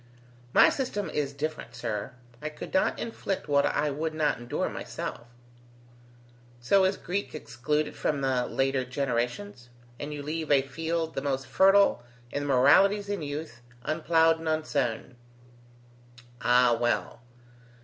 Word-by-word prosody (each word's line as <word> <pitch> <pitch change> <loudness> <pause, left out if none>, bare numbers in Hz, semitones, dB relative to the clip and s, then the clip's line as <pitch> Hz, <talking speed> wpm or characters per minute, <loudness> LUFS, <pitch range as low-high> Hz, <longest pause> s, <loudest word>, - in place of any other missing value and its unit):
"My - - +7
system 225 -7 -3
is 145 -2 -1
different, 155 +2 -5
sir. 105 +2 -4 0.3
I 155 - -3
could 155 - -9
not 190 - +2
inflict 200 -4 -4
what 140 -1 +3
I 150 0 0
would 155 +2 -3
not 150 -5 +1
endure 120 0 -2
myself" 120 - -6 1.3
"So 190 +11 +4
is 190 +1 +1
Greek 195 0 -4
excluded 150 +3 -2
from 145 -2 -1
the 130 -2 +1
later 135 -1 0
generations; 125 +3 -3 0.3
and 145 +1 -5
you 145 -1 -5
leave 155 +2 -4
a 140 -2 +5
field, 160 +4 -3
the - - -3
most 135 -1 -2
fertile 195 +4 +4 0.3
in 145 - -2
the 145 - -3
moralities 195 +11 +5
in 200 -4 -2
youth, 145 -4 -6 0.2
unplowed 160 +1 +3
and 160 0 -3
unsown. 130 -6 -1 1.2
Ah! 125 +1 +5
well. 120 -1 -1
150 Hz, 140 wpm, -28 LUFS, 130-165 Hz, 1.3 s, My